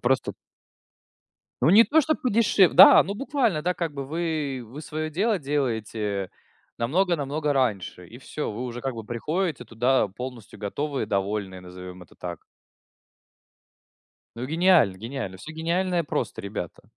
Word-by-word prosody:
Просто 130 +1 +1 1.3
Ну, - - +6
не 215 +5 +8
то, 315 +5 +4
что 310 +1 +1
подешев 215 -6 +3
Да, - - +10
ну 200 - -4
буквально, 235 - 0
да. 180 +2 +1
Как 170 -3 -3
бы 140 -1 -5
вы, 155 -4 -2
вы 130 +7 -9
своё 155 0 -4
дело 200 +5 +1
делаете 110 - -2 0.5
намного-намного 150 +1 0
раньше. 105 -9 -1
И 120 - -12
всё. 150 +2 -5
Вы 110 +4 -5
уже 120 -1 -5
как 135 0 -3
бы 115 -1 -7
приходите 150 - -2
туда 120 +1 +1
полностью 120 +1 -9
готовые, 140 +8 -3
довольные, 100 -1 -2
назовём 90 0 -10
это - - -18
так. - - -7 1.9
Ну, 125 - -4
гениально, 165 - +4
гениально. 115 -2 -6
Всё 155 +12 -10
гениальное 170 +2 0
просто, - - -3
ребята. 100 -4 -6
135 Hz, 140 wpm, -25 LUFS, 110-170 Hz, 1.9 s, Да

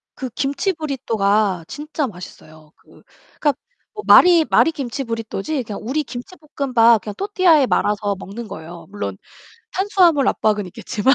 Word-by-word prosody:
그 260 -2 -5
김치 295 +7 -1
브리또가 215 - 0
진짜 295 -1 -4
맛있어요. 155 -5 -13
그 - - -22 0.4
그러니까 290 -2 +2 0.4
뭐 420 - -7
말이 345 -3 +7
말이 325 - +4
김치 275 -2 -4
브리또지 230 +4 -4
그냥 210 -2 -7
우리 290 +6 -1
김치볶음밥 250 - +1
그냥 210 0 -6
또르띠아에 370 -8 +3
말아서 205 -1 0
먹는 220 +4 -8
거예요. 165 0 -10
물론 100 - -5 0.6
탄수화물 360 -7 +3
압박은 210 -3 0
있겠지만. 225 +8 0
245 Hz, 355 characters per minute, -20 LUFS, 205-305 Hz, 0.6 s, 말이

